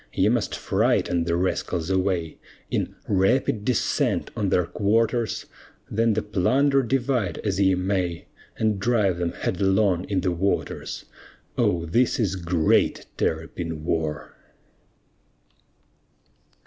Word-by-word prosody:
Ye - - +3
must - - 0
frighten 85 -1 +1
the 85 0 0
rascals 90 -1 -1
away, 90 -4 0 0.3
In - - -1
"rapid 105 +3 +2
descent" 125 0 0
on 100 -3 0
their 90 -2 +2
quarters; 115 +4 0 0.5
Then 115 +1 +2
the 110 - -1
plunder 135 +8 +2
divide 125 - 0
as 100 -3 -1
ye 95 -1 +4
may, 90 -2 -1 0.3
And 110 -2 +1
drive 100 -5 +1
them 85 -1 -1
headlong 95 -1 +1
in 95 -2 -1
the 90 0 0
waters. 95 +4 -2 0.5
Oh, 85 -1 +1
this 120 +12 +1
is 100 -5 +1
great 85 -3 +1
Terrapin 80 0 -3
war! 80 -3 -2
95 Hz, 115 wpm, -24 LUFS, 85-110 Hz, 0.5 s, ye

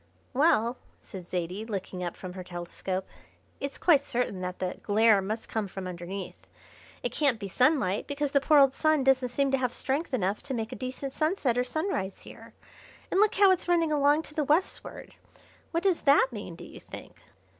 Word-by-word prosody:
"Well," 250 -4 +3 0.2
said 185 -3 -11
Zaidie, 180 +3 -3
looking 195 -4 -5
up 175 - -4
from 185 -1 -7
her 185 0 -7
telescope, 180 +2 -5 0.5
"it's 280 0 -4
quite 290 -5 +4
certain 235 -6 -2
that 180 0 -4
the 185 -1 -4
glare 215 0 +4
must 215 +4 -4
come 220 -2 -2
from 190 0 -7
underneath. 180 +2 -7 0.6
It 245 - -1
can't 270 -3 +1
be 200 - -5
sunlight, 250 - +2
because 285 -1 -2
the 280 - +3
poor 300 +2 +4
old 275 -2 +6
Sun 310 -2 +2
doesn't 260 -1 +3
seem 275 +2 0
to 270 - +2
have 250 -2 0
strength 285 +4 -2
enough 205 -5 0
to 270 -2 -4
make 225 -1 -3
a - - -5
decent 260 +1 -5
sunset 310 -6 0
or 250 - +2
sunrise 250 - -3
here, - - -13 0.6
and 375 - +2
look 425 0 +4
how 395 -1 +6
it's 370 - 0
running 335 -2 +2
along 295 +1 +3
to 300 - -12
the 305 -1 0
westward! 305 +6 -1 0.6
What 335 0 -1
does 380 -4 +2
that 280 -2 +5
mean, 205 -6 -7
do - - -11
you - - -11
think?" - - -11
250 Hz, 195 wpm, -28 LUFS, 195-290 Hz, 0.6 s, old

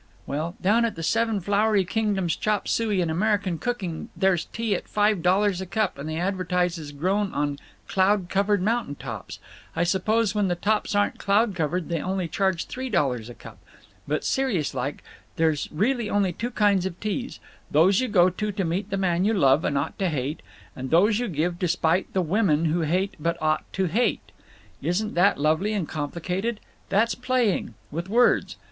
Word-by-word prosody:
"Well, 155 +5 -3
down 215 +5 +3
at 230 - -1
the 165 - -6
Seven 225 +3 +1
Flowery 205 +1 +2
Kingdoms 200 -4 0
Chop 210 -2 -1
Suey 215 -5 +1
and 165 -2 0
American 200 -1 0
Cooking 195 -10 -3
there's 190 -2 +2
tea 225 -2 -2
at 185 - -3
five 210 -3 +2
dollars 190 +1 +2
a 190 - -5
cup 215 +4 0
that 140 +2 -7
they 155 0 -3
advertise 180 -2 0
is 150 -2 -8
grown 190 +7 0
on 145 -1 -1 0.3
'cloud 190 -1 +2
covered 200 0 +1
mountain 225 -8 0
tops.' - - -7 0.4
I 165 - +1
suppose 210 +4 +1
when 205 -2 +1
the 175 - 0
tops 210 +3 0
aren't 205 0 +1
cloud 210 +2 +2
covered 170 0 -1
they 165 -3 -2
only 185 -1 -2
charge 190 +1 0
three 260 +1 -5
dollars 130 - 0
a 120 - -9
cup…. - - -13 0.5
But, 150 +1 -1
serious 230 - 0
like, 135 +2 -4 0.3
there's 160 -3 0
really 225 - 0
only 200 -3 +1
two 235 +8 -3
kinds 200 -5 +2
of 180 -1 -8
teas—those 200 - 0
you 255 - 0
go 185 -4 +4
to 210 +4 -3
to 195 -1 -2
meet 185 +5 -2
the 195 - -1
man 180 -2 +1
you 220 +3 +2
love 140 -4 +4
and 140 - 0
ought 140 +3 -3
to 190 -2 +1
hate, 145 0 -3 0.3
and 130 0 -5
those 205 +7 +4
you 245 - -1
give 170 0 -1
to 180 - +1
spite 170 +2 +1
the 185 - +1
women 165 -3 +2
you 165 +2 +1
hate 180 +5 0
but 170 +2 -1
ought 155 0 -1
to—hate! 195 +6 0 0.5
Isn't 210 +5 -1
that 180 -3 +3
lovely 160 +8 +1
and 195 -7 -1
complicated? 180 +9 -3 0.3
That's 220 +4 +2
playing. 250 -5 0 0.2
With 170 +5 -4
words. 240 +3 +3
190 Hz, 185 wpm, -25 LUFS, 165-210 Hz, 0.5 s, go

